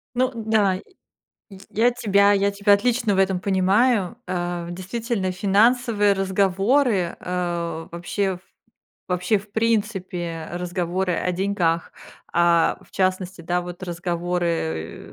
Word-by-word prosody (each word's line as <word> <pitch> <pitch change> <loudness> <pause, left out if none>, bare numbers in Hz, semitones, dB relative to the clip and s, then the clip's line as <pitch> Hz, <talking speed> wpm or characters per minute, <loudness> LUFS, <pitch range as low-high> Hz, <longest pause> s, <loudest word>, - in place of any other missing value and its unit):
Ну 255 +1 +2
да, 220 -3 +2
й 185 - -7 0.9
я 235 +3 +3
тебя 200 -3 +3
я 200 0 +2
тебя 200 0 +3
отлично 225 0 +2
в - - +1
этом 190 -1 +2
понимаю. 200 +3 +2
А, 175 -1 -3
действительно, 190 +2 -3
финансовые 205 +2 +3
разговоры, 195 +2 +1
а, 170 -2 -3
вообще 185 +3 -2
в - - -21 0.7
вообще, 180 +4 +1
в 205 +1 -16
принципе, 190 -7 -1
разговоры 180 +1 -2
о 180 +2 -1
деньгах, 175 -3 0 0.4
а, 170 -1 +3
в - - -21
частности, 185 -1 -1
да, 175 +2 -1
вот 175 +1 -8
разговоры 170 - -3
190 Hz, 120 wpm, -23 LUFS, 175-205 Hz, 0.9 s, я